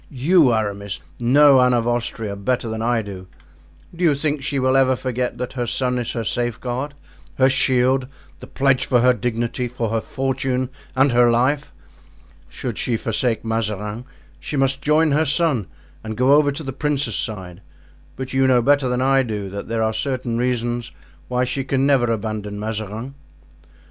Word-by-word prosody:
"You, 145 +1 +3
Aramis, 100 -5 -2 0.2
know 135 +2 +6
Anne 125 0 +4
of 120 -1 0
Austria 115 -3 -2
better 120 +5 -1
than 110 0 -4
I 115 -1 +1
do. 95 -2 -9 0.7
Do 175 - -4
you 155 -4 +4
think 145 0 -1
she 140 +1 -2
will 130 0 +2
ever 130 -1 +4
forget 125 -1 -3
that 125 0 -5
her 120 -2 -3
son 125 +1 0
is 120 - -3
her 115 - -2
safeguard, 120 +5 -3 0.4
her 130 +1 +4
shield, 130 0 +2 0.3
the - - -10
pledge 135 -1 +1
for 125 -2 +3
her 125 +1 +5
dignity, 120 +2 -2
for 120 -2 -3
her 115 0 0
fortune 130 0 -2 0.2
and 135 +1 +4
her 120 0 +5
life? 130 +5 +1 0.8
Should - - -5
she 120 -2 0
forsake 115 +1 -1
Mazarin 110 0 -3 0.3
she 145 - -4
must 135 0 +1
join 150 +2 +3
her 150 +3 +3
son 145 - +1 0.4
and 110 -1 -6
go 130 +3 +4
over 145 -1 +4
to 145 +3 -6
the 135 -2 -5
princes' 145 0 -1
side; 95 -5 -5 0.5
but 130 0 -6
you 135 0 +3
know 125 -2 +4
better 140 0 +3
than 125 0 0
I 135 0 +4
do 105 -6 -4
that 100 +1 -6
there 115 -1 -1
are 110 0 0
certain 125 0 -2
reasons 120 -1 -1 0.4
why 125 0 0
she 130 +2 -2
can 135 0 0
never 130 -4 +3
abandon 105 -2 -4
Mazarin." 110 +3 -5
125 Hz, 175 wpm, -21 LUFS, 115-135 Hz, 0.8 s, know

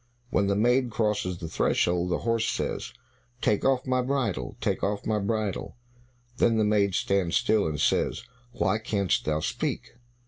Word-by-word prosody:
When 100 -5 +2
the 100 - +2
maid 125 +4 +3
crosses 105 -5 -1
the 85 - -6
threshold, 85 +2 +1
the 90 - +1
horse 115 -1 0
says, - - -3 0.5
"Take 105 - +1
off 135 -1 +2
my 130 -1 +1
bridle, 125 - -2
take - - -1
off 100 +1 -1
my 110 -1 +1
bridle." 105 -1 -2 0.6
Then 115 -1 +3
the 110 - +3
maid 100 -3 +2
stands 95 -4 +1
still, 110 -6 +2
and 75 -1 -3
says, - - +1 0.3
"What, 105 0 0
canst 100 -5 0
thou 75 0 0
speak?" - - -3
105 Hz, 165 wpm, -27 LUFS, 90-115 Hz, 0.6 s, maid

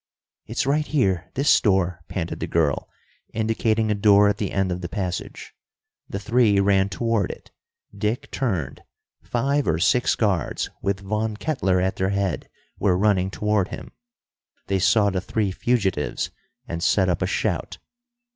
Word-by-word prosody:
"It's 115 +4 -1
right 150 +2 +1
here. 95 - 0
This 140 +3 +4
door!" 90 -4 +1
panted 85 -3 -4
the - - -3
girl, 80 -4 0 0.5
indicating 110 0 +1
a - - +4
door 100 0 +5
at 105 - -1
the 100 - -2
end 95 -1 0
of 90 0 -3
the 85 - -5
passage. 90 -4 -5 0.6
The - - -3
three 105 0 +3
ran 100 0 +3
toward 115 0 0
it. - - -9 0.4
Dick 105 +4 -2
turned. 95 - -2 0.4
Five 140 +4 0
or 80 - +2
six 120 +8 +2
guards 95 - -1
with 100 0 -1
Von 105 +2 -2
Kettler 95 -11 0
at 95 +1 0
their 95 0 0
head, 100 -4 -2 0.3
were 95 -3 +2
running 95 -2 +2
toward 105 -1 0
him. - - -8 0.7
They 95 0 0
saw 100 +2 +4
the 95 -1 -1
three 105 +1 -1
fugitives 95 -8 -1 0.4
and 85 -5 -4
set 95 +1 +3
up 90 -3 0
a - - +1
shout. - - -2
100 Hz, 155 wpm, -23 LUFS, 95-110 Hz, 0.7 s, door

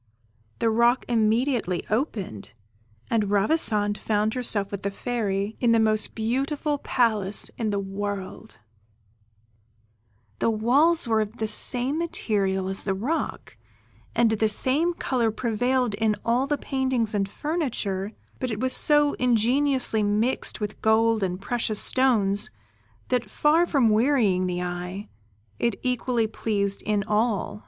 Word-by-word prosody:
The 225 - +1
rock 235 +3 +2
immediately 225 -4 0
opened, 205 - -3 0.6
and 215 -3 +1
Ravissante 205 -1 +1
found 215 0 0
herself 220 -6 -1
with 200 -1 -5
the 200 - -2
Fairy, 205 -1 -3
in 235 -2 +3
the 230 - +3
most 215 -1 +1
beautiful 275 +6 -2
palace 215 -7 +1
in 225 -2 -2
the 200 - -1
world; 200 +1 -6 1.8
the - - +1
walls 260 +9 +2
were 220 -1 +2
of 215 +2 -5
the 220 - -2
same 250 +7 +3
material 200 - -1
as 195 0 -4
the 195 -1 -1
rock, 270 +12 -4 0.6
and 230 -1 +3
the 220 0 +1
same 295 +11 +4
colour 245 -7 0
prevailed 245 +2 -1
in 215 0 0
all 245 +4 +1
the 295 +1 0
paintings 260 -6 -1
and 200 -1 -1
furniture, 225 - -3 0.3
but 255 - -3
it 215 -2 -4
was 260 +1 +1
so 295 -1 +4
ingeniously 250 0 +1
mixed 210 +5 0
with 210 -1 -5
gold 220 0 +2
and 185 -1 -2
precious 225 -2 -1
stones, 215 -7 +2 0.6
that 245 -4 -1
far 315 +9 +2
from 265 -8 +2
wearying 215 -5 +2
the 180 0 -3
eye, 180 +3 -6 0.5
it 235 -3 -1
equally 250 -2 0
pleased 205 -2 -2
in 210 -1 +1
all. 210 -1 -1
220 Hz, 135 wpm, -24 LUFS, 205-255 Hz, 1.8 s, same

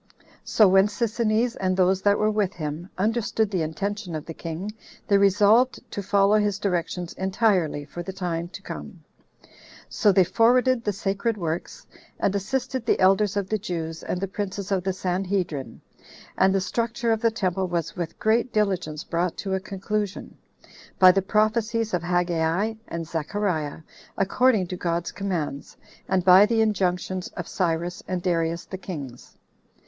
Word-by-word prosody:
So 215 - +5
when 190 +1 +5
Sisinnes, 230 +2 0
and 185 -1 0
those 185 0 +3
that 205 0 +3
were 215 0 +2
with 210 -2 0
him, 155 +2 -5
understood 220 +1 0
the 185 -4 0
intention 195 +3 -3
of 155 - -5
the 165 - -7
king, 170 +6 -5 0.4
they 200 -2 +4
resolved 205 +6 +4
to 200 - -3
follow 200 +2 +3
his 205 -2 0
directions 180 -3 -2
entirely 190 -6 +1
for 175 +4 -7
the 175 - -5
time 175 -3 -3
to 175 - -11
come. - - -8 0.9
So 210 - +3
they 190 0 +5
forwarded 245 +5 +3
the 210 - 0
sacred 200 +3 -1
works, 165 -2 -4 0.3
and 195 - +1
assisted 250 +5 -2
the - - +2
elders 195 +2 +3
of 200 -2 -1
the 215 - 0
Jews, 165 -4 -4
and 180 - -3
the 195 - -2
princes 200 0 -4
of 190 -2 +1
the 190 - +1
Sanhedrim; 180 -5 -2 0.5
and 190 +1 +3
the 195 - +2
structure 230 +3 -1
of 220 -1 +1
the 230 - +4
temple 190 -4 -1
was 170 -2 -3
with 170 -2 -5
great 230 +3 +1
diligence 185 -7 -1
brought 170 0 -1
to 195 -2 -3
a 190 - +1
conclusion, 200 +1 -4 0.6
by 185 -1 +8
the 195 +1 +1
prophecies 220 +2 +1
of 175 - +1
Haggai 175 +3 0
and 165 -1 -5
Zechariah, 160 -2 -2 0.4
according 210 +1 +3
to 180 - -3
God's 170 -1 -2
commands, 175 -8 -4 0.3
and 185 -2 +1
by 190 +2 +8
the 225 0 +2
injunctions 185 -3 0
of 175 - -4
Cyrus 175 0 -1
and 180 -1 -3
Darius 170 -2 0
the 190 - -7
kings. 140 -11 -8
190 Hz, 165 wpm, -25 LUFS, 175-210 Hz, 0.9 s, by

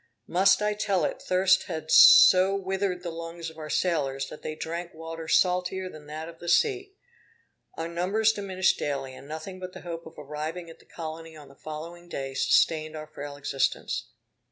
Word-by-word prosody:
Must 195 +3 +3
I 210 0 +1
tell 205 -3 0
it! - - -3
thirst 185 0 +3
had 160 0 -5
so 185 +2 +8
withered 190 -1 -2
the 170 - -4
lungs 165 0 -7
of 160 - -15
our 155 -1 -7
sailors, 140 -6 0
that - - -10
they 155 - -5
drank 170 +2 -5
water 165 0 -7
salter 180 +2 +1
than 150 -1 -13
that 155 +2 -6
of 165 -1 -12
the 175 - -5
sea. 390 - +1 0.8
Our 165 - -4
numbers 195 +6 +1
diminished 190 -3 0
daily, 135 -2 -3
and 135 - -12
nothing 160 +5 -7
but 185 0 -7
the - - -10
hope 170 -1 -7
of 160 - -14
arriving 155 +4 -6
at - - -16
the - - -21
colony 165 0 -8
on 145 -2 -13
the 140 - -17
following 165 +4 -9
day 135 -4 -5
sustained 155 +3 +2
our 155 0 -6
frail 145 -1 -8
existence. 140 -1 -1
165 Hz, 185 wpm, -27 LUFS, 155-185 Hz, 0.8 s, so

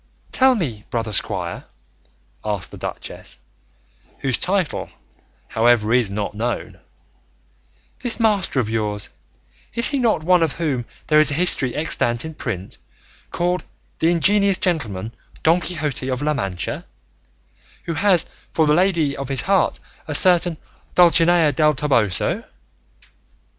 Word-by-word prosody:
"Tell 260 -1 +4
me, 125 - -3
brother 115 -2 -3
squire," - - +1 0.8
asked 105 -4 -3
the - - -10
duchess - - -8 0.8
(whose 130 -3 -1
title, 185 -3 -1 0.6
however, 115 -1 +2
is 120 -5 +2
not 100 +1 -4
known), 115 +3 -4 1.2
"this 245 -2 +1
master 205 - +1
of 120 - -1
yours, 105 -2 -3 0.6
is 235 0 +4
he 280 - -1
not 225 -10 +1
one 180 +1 +3
of 160 -4 +1
whom 140 -8 -2 0.2
there 150 -1 +4
is 155 -1 +5
a 140 - -2
history 145 -7 +3
extant 120 -5 +2
in 160 - -7
print, 100 -10 -6 0.5
called 180 +1 -1 0.4
'The 165 - +2
Ingenious 200 +3 +3
Gentleman, 115 - -2 0.3
Don 165 +3 +3
Quixote 150 -7 -3
of 130 +2 -3
La 150 0 +1
Mancha,' 95 -10 -4 1.0
who 165 - -4
has 185 +1 +2 0.3
for 160 - +2
the 150 - +3
lady 170 -5 +1
of 140 -1 -6
his 135 -1 0
heart 195 -1 +1 0.3
a 150 - -3
certain 175 -1 +4 0.4
Dulcinea 170 -2 +5
del 150 +1 +2
Toboso?" 120 - 0
150 Hz, 130 wpm, -20 LUFS, 120-175 Hz, 1.2 s, is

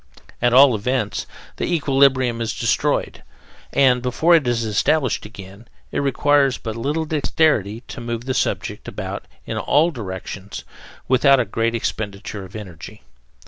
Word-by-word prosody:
At 120 0 +3
all 130 +1 +7
events, 110 0 -2 0.3
the - - -2
equilibrium 135 -6 +2
is 115 - -2
destroyed, - - 0 0.5
and, 125 -3 +4
before 130 +8 +2
it 155 -6 +4
is 120 -1 0
established 115 +3 +1
again, 100 +1 -12 0.2
it - - -1
requires 140 -1 +2
but 110 -2 -6
little 145 +7 -2
dexterity 145 -8 +1
to - - -7
move 120 0 -4
the 130 - -1
subject - - -2
about - - -6 0.2
in - - -3
all 155 +4 +3
directions 100 - -7 0.4
without 135 +1 +5
a 125 - +1
great 115 +3 -1
expenditure 105 -2 -4
of 95 +2 -12
energy. 95 -11 -10
120 Hz, 140 wpm, -21 LUFS, 110-140 Hz, 0.5 s, all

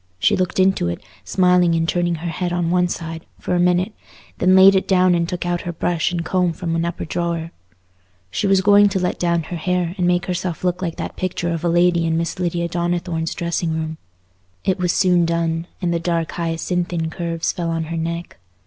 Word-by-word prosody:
She - - +3
looked 185 0 -1
into 190 - +3
it, 85 - -3 0.2
smiling 180 -2 +3
and 165 0 0
turning 175 0 +1
her 170 +2 -4
head 175 +2 -2
on 175 -1 0
one 180 0 +3
side, 165 -1 -5
for - - -3
a 175 - +2
minute, 180 +3 +2 0.5
then 185 +1 +4
laid 190 +1 +8
it 190 0 +1
down 185 -1 +4
and 170 -1 0
took 175 -1 -3
out 175 0 -1
her 175 - -4
brush 170 0 0
and 170 -2 -3
comb 180 0 +1
from 165 0 -3
an 165 0 0
upper 170 0 -4
drawer. 170 0 -2 0.8
She 200 - -1
was 195 -1 +4
going 205 +1 +6
to 190 -1 -1
let 180 - -1
down 170 -1 +1
her 170 +2 -5
hair, 180 +1 -1
and 175 - +2
make 175 0 +2
herself 180 -1 -3
look 180 0 0
like 170 -3 -2
that - - -6
picture 180 -2 -2
of 165 0 -4
a 170 - +2
lady 175 0 +3
in 160 0 +1
Miss 170 +3 -2
Lydia 170 -1 -1
Donnithorne's 170 -1 -2
dressing 170 -1 -1
room. 160 0 -4 0.7
It 190 - +1
was 180 -1 +1
soon 180 -2 +3
done, 165 0 -1 0.2
and 170 -1 +1
the 170 - 0
dark 165 -1 -1
hyacinthine 170 0 -2
curves 165 0 -2
fell 170 -1 -3
on 165 0 -1
her 165 +1 -4
neck. 170 - -4
175 Hz, 215 wpm, -20 LUFS, 165-180 Hz, 0.8 s, laid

